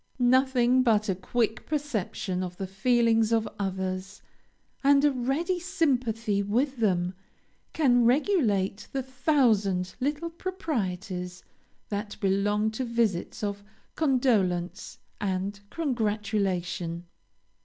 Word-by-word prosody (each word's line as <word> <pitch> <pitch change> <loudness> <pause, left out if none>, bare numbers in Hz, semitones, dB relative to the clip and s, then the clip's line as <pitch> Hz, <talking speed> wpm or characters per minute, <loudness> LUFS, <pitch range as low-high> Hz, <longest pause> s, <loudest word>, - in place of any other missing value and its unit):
Nothing 255 0 +4
but 215 -4 +2
a - - +3
quick 220 +5 -1
perception 220 -10 -2
of 180 -1 -5
the 195 - -3
feelings 225 +3 +2
of 225 -1 +2
others, 190 0 -3 0.6
and 280 +1 +5
a 295 - +5
ready 280 +8 -1
sympathy 250 - 0
with 250 +7 0
them, 180 -5 +1 0.6
can 245 -6 +4
regulate 235 - +2
the 270 -1 -1
thousand 235 - +1
little 295 +5 -2
proprieties 195 - -4 0.5
that 205 0 -4
belong 205 +2 +1
to 220 +4 -3
visits 230 -6 -1
of 205 0 -3 0.3
condolence 220 - +1 0.2
and 195 0 -2
congratulation. 200 - -1
220 Hz, 100 wpm, -27 LUFS, 195-260 Hz, 0.6 s, and